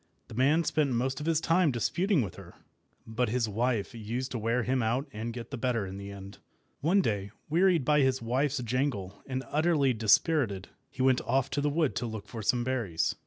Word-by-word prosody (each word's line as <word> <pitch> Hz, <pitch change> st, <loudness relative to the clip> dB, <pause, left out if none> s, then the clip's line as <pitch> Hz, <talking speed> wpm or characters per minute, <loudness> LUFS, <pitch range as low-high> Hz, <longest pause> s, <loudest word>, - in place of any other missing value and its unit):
The -, -, -10 dB
man 140 Hz, +8 st, +3 dB
spent 145 Hz, -4 st, +1 dB
most 130 Hz, +3 st, -1 dB
of 150 Hz, -, -5 dB
his 165 Hz, -2 st, +3 dB
time 165 Hz, +1 st, +3 dB
disputing 165 Hz, -, +1 dB
with 100 Hz, -, -5 dB
her; -, -, -13 dB, 0.5 s
but 115 Hz, +2 st, -1 dB
his 120 Hz, 0 st, 0 dB
wife 115 Hz, +1 st, -1 dB
used 120 Hz, +3 st, -4 dB
to 120 Hz, -, -3 dB
wear 115 Hz, +3 st, 0 dB
him 130 Hz, +2 st, 0 dB
out 120 Hz, +6 st, 0 dB
and 115 Hz, +2 st, -4 dB
get 115 Hz, +1 st, -8 dB
the 135 Hz, -, -5 dB
better 115 Hz, -4 st, 0 dB
in 95 Hz, +1 st, -7 dB
the 100 Hz, 0 st, -7 dB
end. 100 Hz, 0 st, -10 dB, 0.4 s
One 180 Hz, +7 st, +3 dB
day, 100 Hz, -, -1 dB, 0.2 s
wearied 170 Hz, -3 st, +3 dB
by 150 Hz, +1 st, +4 dB
his 130 Hz, -1 st, +2 dB
wife's 130 Hz, +5 st, 0 dB
jangle, 115 Hz, -6 st, -2 dB
and 130 Hz, 0 st, -3 dB
utterly 150 Hz, -4 st, +2 dB
dispirited, 110 Hz, -, +2 dB, 0.2 s
he 130 Hz, -, -3 dB
went 130 Hz, -1 st, +4 dB
off 130 Hz, +2 st, 0 dB
to 145 Hz, -, 0 dB
the 145 Hz, -, +1 dB
wood 150 Hz, -1 st, 0 dB
to 120 Hz, -, -2 dB
look 110 Hz, -2 st, -7 dB
for 115 Hz, -, -6 dB
some 120 Hz, +3 st, +1 dB
berries. 120 Hz, -10 st, -1 dB
125 Hz, 210 wpm, -29 LUFS, 110-145 Hz, 0.5 s, by